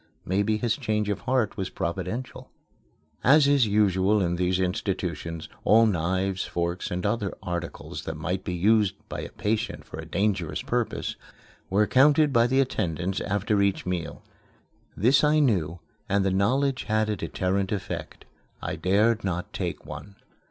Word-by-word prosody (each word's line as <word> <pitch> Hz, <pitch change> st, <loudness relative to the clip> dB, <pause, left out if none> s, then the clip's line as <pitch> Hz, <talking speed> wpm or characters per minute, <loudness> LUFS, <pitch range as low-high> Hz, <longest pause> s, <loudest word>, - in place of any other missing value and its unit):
Maybe 100 Hz, +4 st, +1 dB
his 115 Hz, 0 st, 0 dB
change 110 Hz, -5 st, -1 dB
of 100 Hz, -, -1 dB
heart 125 Hz, -4 st, 0 dB
was 95 Hz, -2 st, -2 dB
providential. 95 Hz, +8 st, -4 dB, 0.7 s
As 145 Hz, +2 st, +6 dB
is 140 Hz, -5 st, +4 dB
usual 100 Hz, 0 st, +3 dB
in 85 Hz, -3 st, 0 dB
these 90 Hz, +1 st, +1 dB
institutions, 90 Hz, -3 st, -2 dB, 0.2 s
all 115 Hz, +2 st, +6 dB
knives, 95 Hz, 0 st, 0 dB
forks, 85 Hz, +1 st, -2 dB
and 90 Hz, +2 st, -3 dB
other 105 Hz, -1 st, 0 dB
articles 85 Hz, -1 st, -5 dB
that -, -, -4 dB
might 90 Hz, +5 st, -3 dB
be 90 Hz, -, -3 dB
used 105 Hz, +1 st, +3 dB
by -, -, -4 dB
a -, -, -6 dB
patient 110 Hz, +2 st, -2 dB
for -, -, -9 dB
a -, -, -6 dB
dangerous 100 Hz, -5 st, -1 dB
purpose -, -, -2 dB, 0.5 s
were 105 Hz, +3 st, +3 dB
counted 145 Hz, +4 st, +4 dB
by 115 Hz, 0 st, +5 dB
the 130 Hz, +2 st, +2 dB
attendants 90 Hz, -, -1 dB
after 100 Hz, +1 st, 0 dB
each 100 Hz, -1 st, +1 dB
meal. 90 Hz, -3 st, -4 dB, 0.7 s
This 130 Hz, -, +4 dB
I 150 Hz, +1 st, +4 dB
knew, 95 Hz, -, +2 dB, 0.3 s
and 100 Hz, 0 st, +2 dB
the 95 Hz, -, +2 dB
knowledge 130 Hz, +8 st, +1 dB
had 110 Hz, 0 st, +1 dB
a 105 Hz, -, 0 dB
deterrent 95 Hz, 0 st, -1 dB
effect. 100 Hz, -3 st, -5 dB, 0.3 s
I -, -, -4 dB
dared 105 Hz, +4 st, +2 dB
not 90 Hz, -2 st, -3 dB
take -, -, -4 dB
one. 100 Hz, -1 st, -9 dB
100 Hz, 155 wpm, -26 LUFS, 90-110 Hz, 0.7 s, As